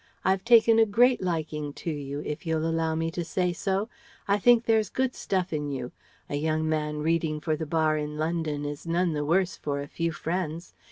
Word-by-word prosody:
I've 190 0 +2
taken 230 -1 +6
a 225 - +5
great 245 +5 +4
liking 155 -4 -2
to 165 - -4
you, 145 -1 -5
if 150 +1 -4
you'll 160 -1 0
allow 165 -1 0
me 165 +1 -1
to 175 +1 -3
say 180 +1 0
so. 195 +4 -1 0.4
I 200 +1 +2
think 240 +2 +5
there's 220 -3 +2
good 260 0 0
stuff 185 -2 -2
in 150 -1 -2
you. 130 -3 -4 0.4
A 145 - -2
young 155 +1 0
man 150 -1 -1
reading 160 -1 0
for 155 0 -1
the 155 0 -5
Bar 155 0 +2
in 150 0 -4
London 155 -2 -2
is 145 +3 -6
none 170 0 +1
the 150 -1 -1
worse 175 +4 +1
for 140 -1 -3
a 140 - -5
few 165 +3 -2
friends. 165 +1 -4
165 Hz, 210 wpm, -27 LUFS, 150-185 Hz, 0.4 s, taken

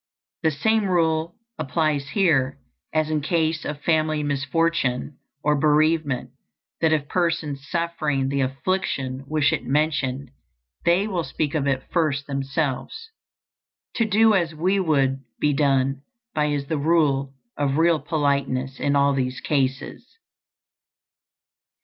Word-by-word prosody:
The 160 - +3
same 215 +9 +1
rule 165 -2 +1 0.2
applies 155 -1 0
here 140 -9 +2 0.3
as 155 0 0
in 155 -1 0
case 160 0 0
of 145 0 -5
family 155 -2 +1
misfortune 145 -2 -1 0.2
or 150 0 +3
bereavement, 150 -3 +2 0.5
that 160 -1 +3
if 150 -2 +1
persons 160 -5 -1
suffering 155 -5 -1
the 140 0 0
affliction 135 -2 -2
wish 150 -1 +2
it - - -2
mentioned, 140 -2 -1 0.5
they 180 +5 +3
will 180 -5 -1
speak 150 -2 -2
of 145 -3 0
it 135 -1 0
first 150 -5 0
themselves. 140 - -3 0.9
To 230 - +3
do 220 +1 +4
as 170 -5 +1
we 185 +5 +1
would 135 -6 +1 0.2
be 150 -1 +2
done 135 -1 +1 0.3
by 150 -1 +1
is 145 -2 -1
the 155 +1 -2
rule 140 -3 +1 0.2
of 140 -1 0
real 165 -1 +4
politeness 140 -3 -1
in 145 0 +1
all 140 0 +4
these 130 -1 -2
cases. 135 - -2
150 Hz, 130 wpm, -23 LUFS, 135-165 Hz, 0.9 s, do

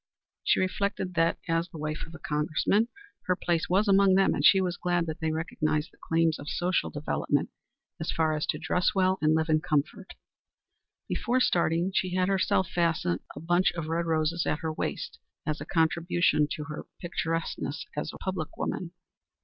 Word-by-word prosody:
She - - +3
reflected 185 0 -1
that, 165 0 +2
as, 165 +1 0
the 165 - -10
wife 155 +1 -4
of 165 - -12
a - - -7
Congressman, 155 +8 +1 0.4
her 180 - +3
place 170 -2 -1
was 195 +4 +3
among 195 -1 +5
them, 195 0 +4
and - - -2
she 195 - +7
was 180 -2 0
glad 175 -1 0
that 160 0 -5
they 160 -1 0
recognized 155 -1 -1
the - - -26
claims 165 -1 +1
of 145 - -7
social 175 - 0
development - - -1 0.5
so 160 - -2
far 160 -1 +2
as 150 -1 -2
to - - 0
dress 175 +4 0
well 190 0 +2
and 155 +1 +4
live 160 0 +1
in 155 -1 +3
comfort. 160 +4 -2 0.9
Before 250 +1 0
starting 170 -4 +2
she 185 -1 0
had 185 0 +2
herself 190 -1 +2
fastened 165 - +1 0.2
a - - -6
bunch 175 +3 +2
of 165 -2 -4
red 170 +1 0
roses 160 +1 +1
at 150 - 0
her 160 -1 -2
waist - - -4 0.3
as 155 +1 -2
a - - -5
contribution 165 -1 +2
to 150 - -5
her 150 0 -7
picturesqueness 165 -2 -3
as - - -3
a - - -10
public 185 -5 -4
woman. 175 -1 -3
165 Hz, 185 wpm, -28 LUFS, 155-185 Hz, 0.9 s, she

